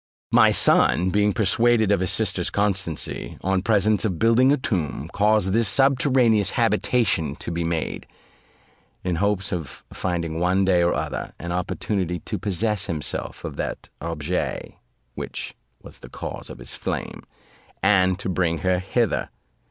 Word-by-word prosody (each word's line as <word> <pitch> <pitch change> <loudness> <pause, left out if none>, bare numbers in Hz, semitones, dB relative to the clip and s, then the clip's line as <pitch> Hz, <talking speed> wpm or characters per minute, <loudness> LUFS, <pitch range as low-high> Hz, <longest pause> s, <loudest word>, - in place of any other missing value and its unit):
"My - - +6
son 90 +2 +4
being 105 +1 +2
persuaded 110 +1 +2
of 100 - +3
his 95 -1 0
sister's 95 -5 +1
constancy, 95 -6 -2
on 95 0 0
presence 105 0 +2
of 95 -6 -1
building 115 +6 +4
a 145 - +3
tomb, 85 - -3
caused 105 -2 +2
this 115 0 +3
subterraneous 130 -4 +3
habitation 85 - +1
to - - -6
be 85 0 -2
made, 80 -1 -3 1.0
in 90 -2 -1
hopes 100 0 0
of 80 -6 -6
finding 85 -3 -3
one 90 +2 +2
day 90 -2 +3
or 85 0 +2
other - - -4
an 85 +1 -6
opportunity 90 0 -2
to 105 +3 -5
possess 105 +2 0
himself 75 -3 -3
of - - -6
that - - -5
objets 85 +1 -3 0.4
which - - -6 0.3
was - - -13
the - - -12
cause - - -7
of - - -9
his - - -6
flame, - - -4 0.6
and 95 -2 +4
to 100 - -5
bring 90 -2 0
her 90 -1 +2
hither. 110 +4 -1
95 Hz, 150 wpm, -23 LUFS, 85-105 Hz, 1.0 s, My